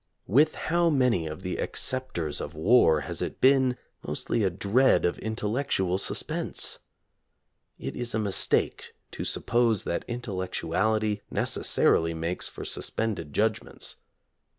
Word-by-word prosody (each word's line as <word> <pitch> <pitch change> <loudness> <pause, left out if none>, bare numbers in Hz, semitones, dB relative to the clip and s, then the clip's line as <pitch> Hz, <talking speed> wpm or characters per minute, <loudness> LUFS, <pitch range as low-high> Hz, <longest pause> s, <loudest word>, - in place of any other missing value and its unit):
With 145 - +4
how 170 +1 +1
many 125 - +2
of 80 +4 -7
the 90 - -3
acceptors 110 - -2
of 75 - -6
war 80 -3 +4
has 70 - -4
it - - -4
been 130 -1 +4 0.2
mostly 115 - -1
a 95 - +3
dread 100 +9 +3
of 85 - 0
intellectual 110 -4 -1
suspense - - -1 1.0
5? - - -5
It - - -9
is 120 -2 -3
a - - +2
mistake 105 -3 0 0.2
to - - -5
suppose 115 -4 +1
that 85 - -2
intellectuality 110 -1 -1
neces - - -1
sarily 80 0 +3
makes 85 +3 -2
for - - -8
suspended 100 -9 -2
judgments. 110 +6 -1
110 Hz, 130 wpm, -27 LUFS, 90-125 Hz, 1.0 s, With